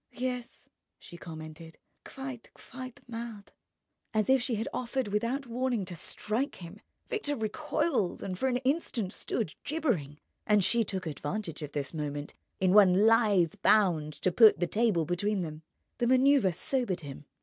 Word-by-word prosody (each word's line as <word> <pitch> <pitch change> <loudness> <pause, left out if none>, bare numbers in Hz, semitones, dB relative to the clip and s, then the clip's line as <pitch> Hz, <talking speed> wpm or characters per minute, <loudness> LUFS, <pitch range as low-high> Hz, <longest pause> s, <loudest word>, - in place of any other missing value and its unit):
"Yes," 250 -1 -5 0.3
she 175 - -13
commented: 160 -1 -9 0.3
"quite, 265 -3 -8
quite 255 -2 -10
mad." 230 -3 -7 0.6
As 215 +4 +3
if 265 -1 +5
she 245 -1 0
had 220 +2 -2
offered 255 -2 -2
without 235 +7 -1
warning 245 -3 -1
to 175 -1 -7
strike 220 - -2
him, 180 +4 -11 0.3
Victor 295 -10 -1
recoiled 240 - -1
and 185 - -3
for 265 - +1
an 250 -1 +1
instant 255 - -1
stood 210 -10 -3
gibbering. 240 - -1 0.3
And 210 -2 +4
she 235 +5 +3
took 190 -3 -4
advantage 160 +2 -4
of 145 -1 -6
this 145 0 -3
moment 145 -2 -4 0.3
in 185 -1 +3
one 200 -1 +6
lithe 215 -7 +4
bound 175 -9 +3
to 185 - +3
put 220 +3 +7
the 175 - +2
table 205 -4 +1
between 190 +3 0
them. 155 -1 -7 0.4
The 240 - +2
manoeuvre 260 -4 +5
sobered 195 -1 -1
him. 145 0 -9
210 Hz, 155 wpm, -30 LUFS, 175-250 Hz, 0.6 s, put